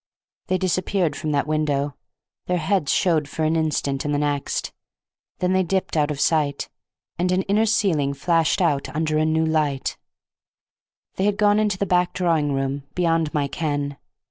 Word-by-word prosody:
They 185 - +1
disappeared 185 -1 0
from 155 -2 -3
that 140 - +1
window. 145 -2 0 0.5
Their 180 - +1
heads 175 -2 0
showed 160 -6 +2
for 160 - -3
an 155 +1 +2
instant 150 -4 0
in 145 - -2
the 145 - +1
next. 145 -1 -2 0.6
Then 180 0 0
they 190 - +3
dipped 190 0 -1
out 150 -1 +2
of 145 -2 -3
sight, 145 -3 +1 0.5
and 180 +1 +1
an 185 +1 +1
inner 210 +3 +2
ceiling 165 -10 +1
flashed 165 +1 +1
out 140 -1 +1
under 155 -1 +1
a 155 - +2
new 160 0 +2
light; 150 -4 -1 1.2
they 190 - +1
had 205 -1 +1
gone 210 0 +4
into 210 -3 +1
the 200 - 0
back 180 -1 +1
drawing 165 -5 +1
room, 135 +1 -1
beyond 165 -3 +1
my 145 -2 0
ken. 145 -1 -2
160 Hz, 170 wpm, -23 LUFS, 145-180 Hz, 1.2 s, gone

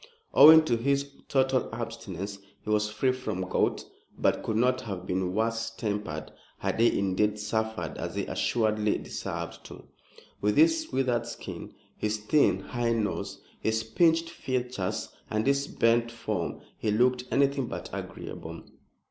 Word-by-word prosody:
Owing 160 +2 +9
to 120 -6 +2
his 140 +3 0 0.2
total 130 -1 +2
abstinence, 105 -4 -5 0.2
he 105 - -3
was 105 0 +2
free 130 +5 +1
from 110 -8 -3
gout, - - 0 0.3
but - - +2
could 110 - -1
not 125 +2 +2
have 95 -4 -6
been 90 0 -1
worse 115 +1 0
tempered 105 -9 -4 0.3
had - - -2
he 115 - +4
indeed 100 +2 +1
suffered, 110 -5 -2
as - - -4
he - - -1
assuredly 110 -2 +1
deserved 85 0 -5
to. - - -11 0.6
With 105 0 +1
his 160 +1 +4
withered 125 -3 0
skin, - - -8 0.2
his 105 0 -1
thin, 110 +8 +3
high 120 -2 -1
nose, 110 -3 -2 0.2
his 110 0 0
pinched 165 +7 +2
features 125 - -3 0.2
and 110 0 0
his 140 +1 +2
bent 115 0 +2
form 110 -6 -3 0.2
he 110 - -1
looked 125 +4 +2
anything 140 -1 +2
but - - -6
agreeable. - - -7
115 Hz, 145 wpm, -28 LUFS, 105-130 Hz, 0.6 s, Owing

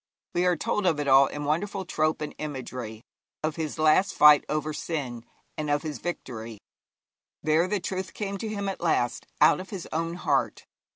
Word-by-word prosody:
We 175 +1 +2
are 180 - +3
told 190 +4 -1
of 160 -4 +2
it 145 - -2
all 135 0 +7
in 150 - -5
wonderful 190 +6 -1
trope 155 -3 0
and 150 - -4
imagery 125 -6 -6 0.4
of 155 -1 -1
his 155 -2 -4
last 155 +5 +3
fight 150 -1 +8
over 155 0 -1
sin, 135 -8 -4 0.4
and 150 -1 -2
of 145 0 +1
his 155 -2 -4
victory. 115 -10 -5 0.9
There 155 +3 +3
the 210 +1 0
truth 185 0 -4
came 200 -2 -3
to 220 - -4
him 200 -2 -3
at 195 - -4
last 140 -8 0
out - - +6
of 185 - -8
his 190 -4 -6
own 165 +1 -1
heart. 180 - 0
155 Hz, 185 wpm, -27 LUFS, 145-180 Hz, 0.9 s, fight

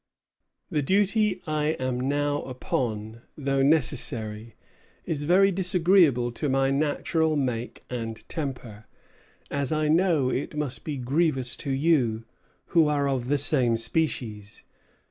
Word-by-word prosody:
The 150 -3 +1
duty 200 +4 +1
I 155 0 0
am 130 -1 -2
now 145 0 0
upon, 115 -3 -4 0.2
though 135 -2 0
necessary, 115 -7 0 0.5
is 145 -2 -2
very 195 +4 +4
disagreeable 175 -9 +3
to 145 +4 -3
my 135 0 +2
natural 155 +2 0
make 125 -4 -3
and 115 -3 -6
temper, 125 -8 -6 0.6
as 140 -2 -1
I 155 -1 0
know 160 -5 +2
it 145 +3 -3
must 135 -6 -3
be 150 -3 -4
grievous 135 0 0
to 140 - -6
you, 135 -6 +1 0.4
who 165 -3 +4
are 145 -1 +1
of 130 -3 -2
the 145 +2 +2
same 125 -5 +3
species. 115 -6 -2
140 Hz, 125 wpm, -26 LUFS, 125-155 Hz, 0.6 s, very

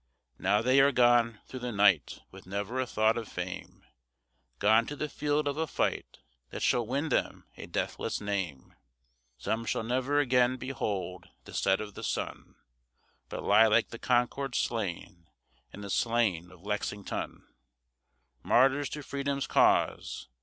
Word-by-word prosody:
Now 105 +3 +2
they 130 +3 +4
are 140 +1 +6
gone 120 -3 +3
through 130 - -8
the 125 0 -4
night 100 - +3
with - - -13
never 100 +6 -3
a 130 - 0
thought 110 0 +2
of 115 - -7
fame, - - -7 0.7
Gone 110 - +4
to 145 - -5
the 150 - -3
field 150 0 -1
of 145 0 -2
a 160 0 -1
fight - - -2 0.3
that - - -5
shall 120 -3 +2
win 140 +6 -1
them - - -1
a - - -9
deathless - - -2
name; 95 -10 -4 0.6
Some 110 - -2
shall 115 - -1
never 130 +5 0
again 125 -2 +3
behold 100 -9 -4
the - - -12
set 95 0 +2
of 105 -1 -6
the - - -9
sun, - - -4 0.7
But - - -5
lie 110 +2 +6
like 110 +1 +3
the 115 - -9
Concord 125 +1 0
slain, 90 -5 -3 0.4
and 100 - -9
the 100 - -7
slain 110 -8 +1
of 90 -1 -17
Lexington, 105 -1 -4 1.0
Martyrs 135 - +3
to 150 - -6
Freedom's 140 0 -2
cause. - - +2
115 Hz, 155 wpm, -30 LUFS, 100-130 Hz, 1.0 s, are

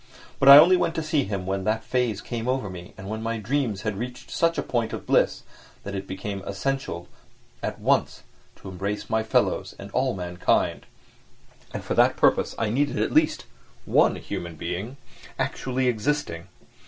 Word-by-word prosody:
But 135 - +6
I 140 - +13
only 175 +5 +8
went 165 - 0
to 160 - -1
see 155 -3 +1
him 95 -2 -4
when 95 0 -2
that 110 +1 0
phase 120 -5 -1
came 120 -1 -5
over 125 -6 -1
me, 90 -1 -10
and 95 - -9
when 110 +1 -4
my 115 +1 -2
dreams 115 -3 -1
had 110 -3 -2
reached 125 +1 -7
such 165 0 +1
a - - 0
point 115 -2 -1
of - - -6
bliss - - +2 0.4
that 100 - -6
it 95 0 -5
became 95 +1 -5
essential 100 -3 -3 0.5
at - - -3
once - - +1 0.3
to 95 - -10
embrace 100 +3 -4
my 110 0 +2
fellows 110 - 0
and 100 +1 -10
all 130 +1 0
mankind; 90 -1 0 0.8
and - - -5
for - - -2
that - - +4
purpose - - +2
I 110 -2 0
needed, 145 +5 0
at - - 0
least, - - +2 0.4
one - - +4
human 85 -1 -6
being, 95 - -5 0.4
actually 130 0 -1
existing. 115 - -1
110 Hz, 180 wpm, -25 LUFS, 95-130 Hz, 0.8 s, I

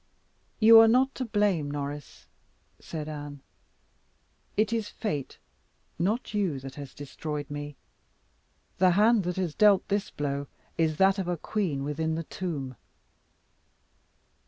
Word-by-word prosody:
"You 225 +1 +9
are 225 - +8
not 260 +4 +3
to 255 - -3
blame, 205 -9 +1
Norris," 145 0 -6 0.5
said 155 -2 -6
Anne; 145 -2 -7 1.2
"it 215 +1 +2
is 225 -2 -1
fate, 150 - -4 0.6
not 210 +7 -1
you, 190 -9 0
that 135 0 -8
has 140 -2 -9
destroyed 145 0 -6
me. 145 0 -5 1.0
The 185 0 +6
hand 215 -2 +4
that 180 0 -1
has 180 -5 -2
dealt 205 0 +4
this 200 0 0
blow 140 -1 -3 0.3
is 160 -2 +1
that 195 +2 +4
of 190 - -2
a 175 -1 -1
queen 160 -7 -2
within 160 +3 -1
the 165 - -3
tomb." 145 -8 -5
165 Hz, 135 wpm, -28 LUFS, 145-205 Hz, 1.2 s, You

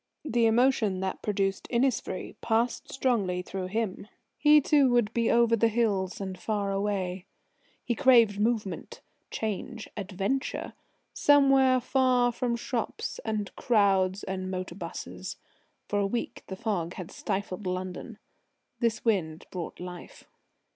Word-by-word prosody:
The 235 -5 +3
emotion 225 -4 +3
that 190 - -3
produced 195 -2 -1
Innisfree 255 +2 0
passed 230 +2 0
strongly 205 -9 0
through 185 0 -4
him. 205 0 -3 0.3
He 300 0 +6
too 285 -2 +4
would 240 -3 +2
be 230 -1 +1
over 235 -1 +4
the 230 +1 +3
hills 210 -5 0
and 190 -2 -5
far 205 -1 -1
away. 195 -2 -2 0.6
He 240 - +1
craved 235 -5 +5
movement, 215 -3 -1 0.3
change, 220 +2 -4
adventure 205 +6 -2 0.4
somewhere 270 -3 +5
far 250 -1 +2
from 240 0 -1
shops 235 0 -3
and 215 -3 -3
crowds 195 -4 +2
and 185 -1 -4
motor 185 -1 -4
'busses. 170 -2 -7 0.5
For 205 - 0
a 200 - +2
week 235 +4 -4
the 190 - -5
fog 180 -4 -2
had 180 -2 -7
stifled 190 0 -3
London. 185 +5 -4 0.6
This 230 -2 0
wind 170 -8 0
brought 175 -3 -6
life. 180 -1 -9
210 Hz, 130 wpm, -28 LUFS, 190-240 Hz, 0.6 s, He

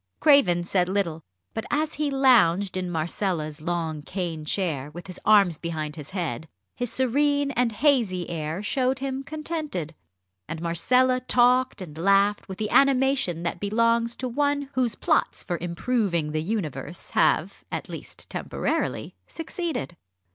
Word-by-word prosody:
Craven 210 - +5
said 180 0 +1
little, 180 -5 -1 0.3
but 225 - -3
as 305 +1 0
he 300 0 -1
lounged 215 -9 +4
in 185 -1 -2
Marcella's 160 -2 -2
long 160 -2 -2
cane 165 -2 -4
chair 150 -5 -1
with 175 +3 -10
his 185 -2 -8
arms 200 -7 +5
behind 155 -3 -4
his 150 -3 -9
head, 170 -4 -3 0.3
his 245 -2 -2
serene 285 +2 +2
and 250 -3 +1
hazy 220 - +2
air 160 +3 -4
showed 260 +4 +1
him 270 0 -3
contented; 305 - -4 0.5
and 165 0 -5
Marcella 250 +10 +2
talked 250 -2 +3
and 155 -3 -10
laughed 200 +3 +3
with 190 - -6
the 215 -1 -3
animation 265 -10 +3
that 170 - -2
belongs 230 +3 +1
to 255 - -3
one 285 +2 0
whose 245 -4 0
plots - - +1
for 175 -3 -3
improving 175 -3 0
the 155 0 -1
universe 170 - -4
have - - +2
at - - -4
least - - -8
temporarily - - -2
succeeded. 325 - -4
200 Hz, 145 wpm, -25 LUFS, 170-255 Hz, 0.5 s, Craven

